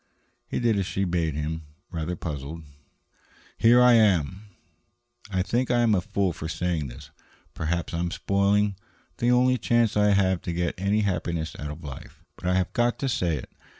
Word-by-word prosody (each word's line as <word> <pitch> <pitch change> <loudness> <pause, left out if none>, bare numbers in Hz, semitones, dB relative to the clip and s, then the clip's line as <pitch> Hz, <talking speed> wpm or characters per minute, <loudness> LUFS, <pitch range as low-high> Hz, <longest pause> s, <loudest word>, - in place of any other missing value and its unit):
He - - -2
did 115 -4 +2
as 95 - -1
she 95 - -1
bade 85 -4 0
him, 80 +2 -3 0.3
rather 85 +1 -3
puzzled. 80 0 -6 0.9
"Here 120 +2 +5
I 125 -1 +7
am." 100 -3 +3 0.8
"I 95 -2 0
think 120 +6 0
I 120 -1 +3
am 115 -2 +3
a 95 - +2
fool 95 -1 -1
for 80 0 -6
saying 85 -4 -1
this. 70 +4 -11 0.4
Perhaps 85 +2 -2
I 85 - -1
am 85 0 0
spoiling 100 +2 +1 0.4
the 120 - +1
only 125 +1 +4
chance 115 0 +2
I 105 0 +4
have 95 -2 +2
to 85 - -4
get 85 0 -1
any 100 +3 +1
happiness 85 -5 -2
out 75 - -4
of 75 +3 -8
life. 70 -3 -10
But 90 - -6
I 90 - +2
have 95 -1 0
got 120 0 +1
to 135 - -2
say 90 - 0
it. 65 - -9
90 Hz, 185 wpm, -26 LUFS, 80-105 Hz, 0.9 s, I